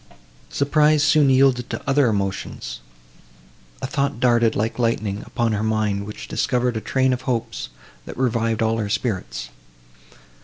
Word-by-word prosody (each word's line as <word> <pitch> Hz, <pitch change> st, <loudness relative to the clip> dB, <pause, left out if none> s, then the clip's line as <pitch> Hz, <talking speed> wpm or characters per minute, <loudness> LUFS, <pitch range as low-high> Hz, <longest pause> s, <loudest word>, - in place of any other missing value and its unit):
Surprise 150 Hz, +1 st, +3 dB
soon 145 Hz, -1 st, +4 dB
yielded 130 Hz, -2 st, +3 dB
to -, -, -6 dB
other 140 Hz, -1 st, +3 dB
emotions; 95 Hz, -, -3 dB, 1.0 s
a -, -, +1 dB
thought 140 Hz, -2 st, -1 dB
darted, 120 Hz, -3 st, +3 dB
like 110 Hz, +3 st, -2 dB
lightning, 110 Hz, -3 st, 0 dB
upon 115 Hz, -1 st, 0 dB
her 105 Hz, -1 st, -1 dB
mind, 105 Hz, -2 st, 0 dB
which 105 Hz, -, -8 dB
discovered 125 Hz, -3 st, 0 dB
a 110 Hz, -, -2 dB
train 130 Hz, +2 st, +1 dB
of 125 Hz, -, -3 dB
hopes, 115 Hz, -, -2 dB, 0.4 s
that -, -, -9 dB
revived 115 Hz, -3 st, 0 dB
all 110 Hz, 0 st, +1 dB
her 105 Hz, -2 st, -2 dB
spirits. 60 Hz, -, -3 dB
115 Hz, 145 wpm, -22 LUFS, 105-130 Hz, 1.0 s, soon